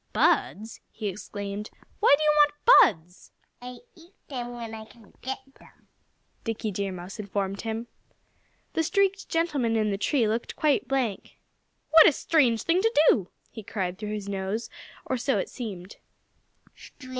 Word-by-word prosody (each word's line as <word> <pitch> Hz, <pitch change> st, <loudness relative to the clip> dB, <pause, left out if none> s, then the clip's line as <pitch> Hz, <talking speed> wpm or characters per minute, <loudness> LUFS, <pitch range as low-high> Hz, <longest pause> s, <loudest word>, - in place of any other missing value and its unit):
"Buds!" 220 Hz, +3 st, +1 dB
he 215 Hz, -, -5 dB
exclaimed. 200 Hz, +1 st, -6 dB, 0.3 s
"Why 415 Hz, -9 st, +6 dB
do 310 Hz, -, -2 dB
you 305 Hz, -, +4 dB
want 295 Hz, -, +6 dB
buds?" 180 Hz, +2 st, -21 dB, 0.3 s
"I 250 Hz, 0 st, -9 dB
eat 340 Hz, +3 st, -19 dB
them 245 Hz, -3 st, -5 dB
when 230 Hz, -2 st, -7 dB
I 220 Hz, -1 st, -7 dB
can 220 Hz, -1 st, -19 dB
get 265 Hz, +1 st, -3 dB, 0.2 s
them," -, -, -21 dB, 0.6 s
Dickie 225 Hz, -2 st, -3 dB
Deer 195 Hz, 0 st, -3 dB
Mouse 185 Hz, +3 st, -8 dB
informed 200 Hz, -1 st, -3 dB
him. 225 Hz, +1 st, -4 dB, 0.9 s
The -, -, +1 dB
streaked 395 Hz, +3 st, 0 dB
gentleman 290 Hz, -9 st, 0 dB
in 215 Hz, -2 st, +1 dB
the 195 Hz, -, -3 dB
tree 240 Hz, 0 st, +1 dB
looked 225 Hz, +2 st, -2 dB
quite 295 Hz, -5 st, +1 dB
blank. 255 Hz, -7 st, -2 dB, 0.5 s
"What 320 Hz, 0 st, +9 dB
a -, -, +7 dB
strange 255 Hz, -8 st, +2 dB
thing 345 Hz, +3 st, +2 dB
to 450 Hz, +2 st, +2 dB, 0.2 s
do!" 190 Hz, -5 st, +2 dB, 0.2 s
he 225 Hz, -, -8 dB
cried 190 Hz, -3 st, -4 dB
through 210 Hz, 0 st, -4 dB
his 205 Hz, -2 st, -5 dB
nose 200 Hz, +3 st, -3 dB, 0.3 s
or 260 Hz, -, -1 dB
so 270 Hz, +3 st, 0 dB
it -, -, -2 dB
seemed. 200 Hz, -6 st, -8 dB
225 Hz, 155 wpm, -26 LUFS, 200-285 Hz, 0.9 s, What